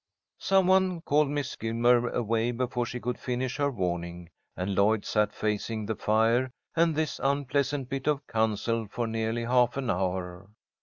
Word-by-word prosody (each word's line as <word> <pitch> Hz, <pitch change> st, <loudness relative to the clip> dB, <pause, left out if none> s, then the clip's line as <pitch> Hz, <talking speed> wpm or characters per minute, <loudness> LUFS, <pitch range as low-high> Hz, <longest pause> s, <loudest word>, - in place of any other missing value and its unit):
Some 190 Hz, -1 st, +3 dB
one 185 Hz, -2 st, +3 dB
called 150 Hz, -1 st, +2 dB
Miss 145 Hz, -2 st, -3 dB
Gilmer 120 Hz, +2 st, +2 dB
away 115 Hz, 0 st, 0 dB
before 120 Hz, 0 st, -1 dB
she 125 Hz, -, -5 dB
could 125 Hz, 0 st, -3 dB
finish 125 Hz, +1 st, -2 dB
her 145 Hz, -1 st, +1 dB
warning, 85 Hz, -6 st, -3 dB, 0.3 s
and 95 Hz, +2 st, -2 dB
Lloyd 100 Hz, +2 st, +2 dB
sat 105 Hz, -1 st, +1 dB
facing 110 Hz, +1 st, -2 dB
the 110 Hz, -, -1 dB
fire 115 Hz, +4 st, +2 dB, 0.3 s
and 165 Hz, -1 st, +3 dB
this 155 Hz, 0 st, -1 dB
unpleasant 140 Hz, 0 st, 0 dB
bit 135 Hz, +1 st, -4 dB
of 145 Hz, -2 st, +1 dB
counsel 110 Hz, 0 st, 0 dB
for 120 Hz, +2 st, -2 dB
nearly 115 Hz, +1 st, -2 dB
half 125 Hz, +1 st, +2 dB
an 130 Hz, -3 st, 0 dB
hour. 90 Hz, 0 st, -3 dB
120 Hz, 160 wpm, -28 LUFS, 110-135 Hz, 0.3 s, Some